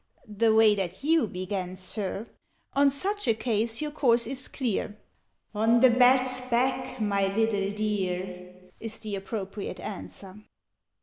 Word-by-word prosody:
_' 210 - -11
(The 230 -1 +5
way 220 -1 +6
that 190 +1 -4
you 315 -4 +3
began, 185 -1 -4
Sir,) 195 +3 -3 0.5
In 280 0 +5
such 400 +9 -2
a 225 - +4
case 225 +1 -1
your 300 - -3
course 245 -6 +2
is 260 +2 -6
clear 220 -5 -2 0.6
'On 225 +3 +3
the 255 0 +7
bat's 255 +1 +4
back, 255 +1 0
my 200 -2 +1
little 210 -3 +1
dear!' 185 -3 -3 0.3
Is 225 -1 -6
the 215 -2 -5
appropriate 195 0 -5
answer. 195 0 -8
220 Hz, 140 wpm, -27 LUFS, 195-255 Hz, 0.6 s, the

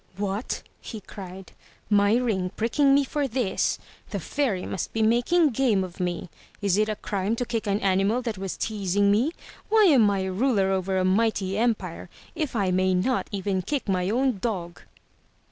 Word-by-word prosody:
'*What!'' 205 +3 -3 0.2
he 220 - -7
cried. 190 -1 -10 0.4
'*My 205 +1 +4
ring 215 -7 0
pricking 275 +5 +3
me 285 - +4
for 285 +1 -1
this! 240 -6 0 0.3
The - - -3
Fairy 245 -11 -1
must 190 - -4
be 225 - +1
making 245 +9 +3
game 225 -5 +2
of 185 0 -9
me! 180 -1 -3 0.3
Is 200 -3 +1
it 215 +1 +2
a 215 - -1
crime 200 +2 -2
to 245 - -2
kick 230 -3 -3
an 200 0 +1
animal 195 +5 +2
that 225 -5 -3
was 195 -1 -4
teasing 200 -2 +1
me? 235 +10 +2 0.4
Why 440 0 +5
am 265 - +6
I 195 -1 0
ruler 195 0 +1
over 190 0 0
a 185 - +1
mighty 195 -1 +1
empire 210 -7 -1 0.2
if 310 -6 -3
I 195 -4 +1
may 185 0 +2
not 245 +8 0
even 195 -2 -1
kick 280 +6 -3
my 185 -1 0
own 250 -1 +1
dog? 180 -6 -4
205 Hz, 180 wpm, -25 LUFS, 190-240 Hz, 0.4 s, am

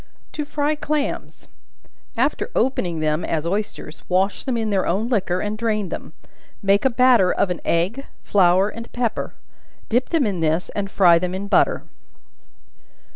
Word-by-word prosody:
To 300 - -4
Fry 295 +1 0
Clams. 300 -1 -3 0.7
After - - 0
opening 180 -10 0
them 155 +2 0
as 160 -1 -2
oysters, 195 -4 -4
wash 190 +2 +1
them 255 -3 -1
in 220 -2 -1
their 195 -2 +1
own 200 +7 0
liquor 190 -7 0
and 210 0 -2
drain 215 -3 -1
then; - - -7 0.5
make 200 +4 +3
a - - +6
batter 240 -6 +4
of 185 - 0
an 180 - -4
egg, 190 +11 -1 0.2
flour 190 0 +4
and 230 +2 -8
pepper; 240 -3 -2 0.5
dip 245 +3 +1
them 325 -6 +2
in 195 -5 -2
this, 160 +2 0
and 200 -1 -3
fry 175 -4 +5
them 180 +1 -3
in 200 +2 -4
butter. - - +2
200 Hz, 160 wpm, -22 LUFS, 180-235 Hz, 0.7 s, a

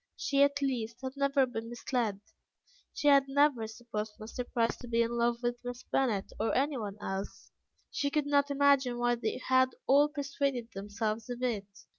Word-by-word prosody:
She 280 0 +1
at 280 0 +3
least 240 -3 -2
had 260 +1 -4
never 275 -1 +3
been 230 -2 -6
misled; 235 -4 -2 0.7
she 290 - -2
had 280 -1 +6
never 270 -5 +2
supposed 220 -1 -5
Mr. 220 +3 -5
Price 230 -1 +1
to 245 - -10
be 230 0 +2
in 230 - -2
love 235 0 +1
with 240 0 -2
Miss 245 0 -6
Bennet 225 -8 0
or 225 - 0
anyone 250 -8 -1
else. 195 +1 -5 0.4
She 285 - 0
could 300 0 0
not 285 0 +2
imagine 280 -3 +3
why 240 0 +2
they 235 -2 -2
had 260 0 +4
all 285 +2 +5
persuaded 280 -4 -2
themselves 215 +3 -3
of 245 +1 -5
it. 215 -6 -1
245 Hz, 175 wpm, -31 LUFS, 225-275 Hz, 0.7 s, had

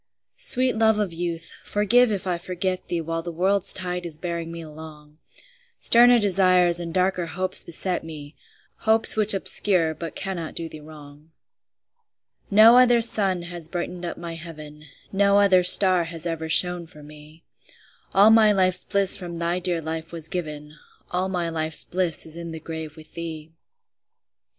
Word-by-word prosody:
Sweet 260 - +2
love 220 -1 +2
of 205 -5 -3
youth, 165 -1 -6
forgive 225 +4 +2
if 195 -3 -4
I 180 -2 -3
forget 185 +1 -5
thee 170 -1 -3
While 165 +1 -5
the 170 +1 -7
world's 190 +3 +2
tide 180 -1 -2
is 165 -3 -4
bearing 170 -1 -6
me 170 0 -9
along; 155 -1 -14 0.6
Sterner 240 +1 +5
desires 185 -4 +2
and 170 -1 -6
darker 185 0 -1
hopes 185 +3 -1
beset 180 +2 -3
me, 155 -2 -11 0.4
Hopes 220 0 +1
which 215 -1 +4
obscure 180 -4 +3
but 165 +1 -9
cannot 180 -5 -6
do 165 - -4
thee 155 - -12
wrong. 150 0 -15 1.2
No 225 +4 +6
other 245 -1 +4
sun 195 -6 +2
has 170 -2 -8
brightened 175 0 -6
up 175 - -6
my 170 -1 -8
heaven, 155 -2 -12 0.3
No 200 0 +2
other 195 -3 +3
star 180 -1 +7
has 165 0 -9
ever 160 -1 -5
shone 180 +1 +2
for 150 -2 -16
me; 150 +2 -16 0.7
All 205 +3 +5
my 220 -1 +5
life's 185 -2 +1
bliss 200 -1 +2
from 175 -3 -8
thy 170 +1 -3
dear 175 -2 -2
life 160 0 -7
was 165 -2 -3
given, 150 -4 -7 0.4
All 185 +1 -2
my 175 -2 -3
life's 160 -1 0
bliss 175 -3 -2
is 160 0 -6
in 170 -1 -8
the 160 - -8
grave 160 -1 -9
with 155 0 -17
thee. 160 -2 -8
175 Hz, 165 wpm, -22 LUFS, 160-190 Hz, 1.2 s, star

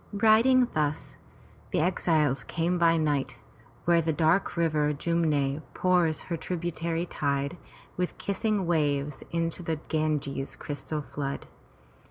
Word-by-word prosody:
Riding 225 +5 +5
thus, 150 -1 -1 0.5
the - - 0
exiles 155 -6 +2
came 175 +5 -1
by 165 -1 +4
night 150 -4 0 0.5
where 170 -1 +4
the 160 0 0
dark 160 +4 +2
river 155 -3 +2
Jum'ne 150 -3 0
pours 175 -4 +2
her 170 - -4
tributary 170 0 -2
tide 140 -1 -1 0.4
with 180 0 -2
kissing 200 0 -1
waves 150 -4 0
into 165 +1 -1
the 165 -2 -1
Ganges' 150 -3 -1
crystal 150 +1 -5
flood. 140 -1 -4
160 Hz, 120 wpm, -28 LUFS, 150-175 Hz, 0.5 s, Riding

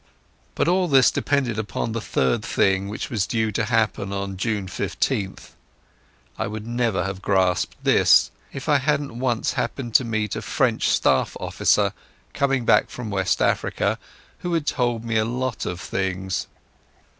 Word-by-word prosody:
But - - +1
all 180 +1 +3
this 135 -5 +5
depended 130 -6 0
upon 110 +1 -3
the 115 0 -3
third 65 -9 0
thing, 95 0 +1
which 105 - -5
was 105 -5 0
due 110 -1 0
to 110 +2 -1
happen 110 -3 0
on 100 0 -3
June 105 0 -1
15th. 95 +1 -2 0.9
I - - -1
would 105 +1 -6
never 115 -6 0
have 95 +1 -4
grasped 95 -3 +1
this - - +5 0.2
if 135 +1 -7
I 145 -2 +4
hadn't 140 -3 -1
once 120 -3 0
happened 120 -5 -3
to 130 - +5
meet 110 -3 -2
a - - -3
French - - +1
staff 65 - +2
officer, - - +2 0.4
coming 135 -3 +1
back - - +4
from 120 -4 -6
West 95 -1 +1
Africa, - - 0 0.4
who 175 -1 -2
had 160 -3 -1
told 120 -5 0
me 115 -1 0
a 110 - +3
lot 125 +1 -2
of 90 - -4
things. 95 0 -2
110 Hz, 160 wpm, -23 LUFS, 95-125 Hz, 0.9 s, this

